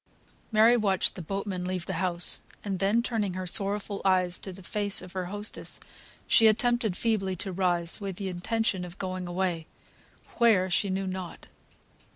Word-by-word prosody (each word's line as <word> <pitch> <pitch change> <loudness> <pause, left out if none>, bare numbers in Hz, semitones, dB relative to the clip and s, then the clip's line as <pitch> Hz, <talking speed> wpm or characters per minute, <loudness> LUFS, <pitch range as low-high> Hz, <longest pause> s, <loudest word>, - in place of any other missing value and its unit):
Mary 225 +2 +6
watched 200 -5 +2
the 185 - -7
boatman 195 +1 -4
leave 180 -1 -3
the - - -4
house, 175 -2 +2 0.2
and 195 -3 -3
then, 210 +4 +2
turning 210 -6 -1
her 185 0 -4
sorrowful 200 +2 0
eyes 185 -2 +2
to 190 - -7
the 185 +1 -11
face 205 +1 0
of 180 - -9
her 185 -1 -3
hostess, 205 +3 +2 0.5
she 225 - +6
attempted 225 -2 +2
feebly 200 -5 0
to 190 +2 -5
rise, 175 0 0
with 195 -2 -4
the 195 +1 -4
intention 190 +2 -1
of 180 0 -9
going 185 -1 -4
away, 175 -2 -2 0.7
where 200 -6 +4
she 200 +3 +2
knew 190 +1 -1
not. 185 -2 -6
190 Hz, 170 wpm, -28 LUFS, 180-210 Hz, 0.7 s, Mary